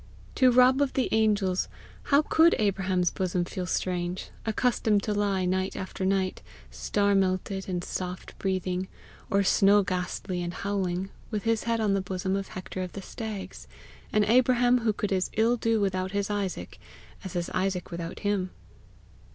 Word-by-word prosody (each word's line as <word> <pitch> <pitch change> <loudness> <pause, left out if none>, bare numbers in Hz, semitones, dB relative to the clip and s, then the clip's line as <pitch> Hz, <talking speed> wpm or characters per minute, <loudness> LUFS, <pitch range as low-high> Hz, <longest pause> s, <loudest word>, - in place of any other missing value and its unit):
To 255 -2 +5
Rob 255 +2 +5
of 280 -2 +1
the 260 - 0
Angels 205 -4 +2 0.4
tow 285 +2 +5
could 325 +2 +5
Abraham's 190 -3 +1
bosom 180 -1 -1
feel 180 0 -5
strange, 180 +1 -2 0.2
accustomed 220 -2 +2
to 210 - -1
lie 200 -2 +1
night 185 +1 0
after 190 0 -4
night, 190 -1 0 0.3
star 205 -1 +1
melted 190 0 0
and 175 -1 -2
soft 180 0 -5
breathing, 185 -1 -1 0.4
or 200 0 +3
snow 200 +1 +5
ghastly 180 0 -3
and 175 0 -4
howling, 195 -2 -2 0.2
with 210 -3 -3
his 225 -1 0
head 230 -1 +1
on 210 -2 +2
the 195 - +1
bosom 190 0 -2
of 195 0 -3
Hector 185 0 -6
of 180 -1 -5
the 195 - -7
Stags 215 -2 -7 0.4
an 215 - +3
Abraham 245 +2 +4
who 225 -2 +1
could 210 0 -3
as 185 -1 0
ill 230 +2 +3
do 225 -1 +1
without 190 -1 -1
his 200 0 -1
Isaac, 200 -3 -3 0.4
as 190 - -6
his 175 -1 -2
Isaac 185 -1 -1
without 170 -1 -6
him! 205 -3 0
195 Hz, 165 wpm, -27 LUFS, 185-215 Hz, 0.4 s, To